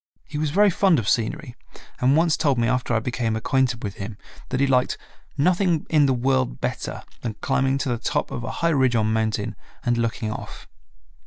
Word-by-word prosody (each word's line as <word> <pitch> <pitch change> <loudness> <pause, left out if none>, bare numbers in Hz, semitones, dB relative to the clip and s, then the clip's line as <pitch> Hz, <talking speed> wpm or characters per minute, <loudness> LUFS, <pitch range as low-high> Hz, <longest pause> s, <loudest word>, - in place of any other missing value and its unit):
He 150 - -5
was 155 -1 0
very 200 +6 +4
fond 185 -2 +3
of 115 -5 -2
scenery 120 +2 -1 0.4
and 130 +4 +4
once 165 -1 +3
told 145 -5 +1
me 115 0 +2
after 125 -1 0
I - - +3
became 115 -1 -2
acquainted 125 +1 0
with 100 -2 -5
him 100 +1 -6 0.3
that 130 - -1
he 140 - +4
liked 125 -2 +2 0.4
"nothing 175 +1 +2
in 150 -3 +5
the - - +3
world 125 - 0
better - - -4 0.2
than 115 -3 -4
climbing 135 +2 +1
to 135 - -2
the 120 -2 -1
top - - -1
of 120 - -4
a - - -4 0.2
high - - +5
ridge 130 -6 +3
or 110 -2 +2
mountain 110 0 -1 0.3
and 120 -1 +1
looking 115 -1 -1
off." - - -8
125 Hz, 200 wpm, -23 LUFS, 115-145 Hz, 0.4 s, in